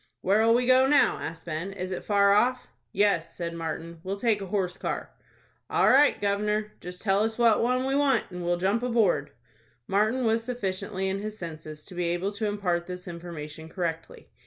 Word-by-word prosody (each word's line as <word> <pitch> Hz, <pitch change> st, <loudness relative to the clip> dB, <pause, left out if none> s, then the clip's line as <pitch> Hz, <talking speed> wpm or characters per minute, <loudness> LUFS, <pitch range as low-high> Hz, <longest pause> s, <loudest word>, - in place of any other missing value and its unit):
"Where'll 220 Hz, +4 st, +4 dB
we 245 Hz, +1 st, +2 dB
go 260 Hz, +1 st, +5 dB
now?" 290 Hz, +1 st, +4 dB
asked 165 Hz, 0 st, -6 dB
Ben. 170 Hz, +3 st, -4 dB
"Is 185 Hz, -1 st, -5 dB
it 185 Hz, -, -4 dB
far 200 Hz, -1 st, +4 dB
off?" 250 Hz, +4 st, +2 dB, 0.3 s
"Yes," 200 Hz, -, +1 dB
said 170 Hz, -1 st, -3 dB
Martin. 165 Hz, 0 st, -5 dB
"We'll 195 Hz, +1 st, -3 dB
take 215 Hz, -1 st, +1 dB
a 195 Hz, -, -5 dB
horse 185 Hz, -2 st, -1 dB
car." -, -, -4 dB, 0.6 s
"All -, -, +3 dB
right, 285 Hz, +3 st, +5 dB
gov'nor; 210 Hz, +1 st, 0 dB
just 180 Hz, 0 st, -9 dB
tell 195 Hz, -2 st, +2 dB
us 225 Hz, 0 st, -1 dB
what 230 Hz, -3 st, +4 dB
one 255 Hz, +2 st, +1 dB
we 270 Hz, -, 0 dB
want, 280 Hz, -4 st, +3 dB
and 180 Hz, 0 st, -6 dB
we'll 175 Hz, 0 st, +1 dB
jump 195 Hz, +6 st, +1 dB
aboard." 230 Hz, -6 st, +1 dB, 0.6 s
Martin 215 Hz, -, +1 dB
was 225 Hz, 0 st, +2 dB
sufficiently 195 Hz, -4 st, -3 dB
in 190 Hz, +1 st, -1 dB
his 215 Hz, +1 st, -6 dB
senses 155 Hz, -3 st, -8 dB
to 190 Hz, -, -12 dB
be 175 Hz, 0 st, -2 dB
able 175 Hz, +4 st, -1 dB
to 210 Hz, +1 st, -3 dB
impart 180 Hz, -4 st, -1 dB
this 180 Hz, 0 st, -7 dB
information 160 Hz, -2 st, -8 dB
correctly. 165 Hz, -2 st, -5 dB
200 Hz, 190 wpm, -27 LUFS, 175-225 Hz, 0.6 s, go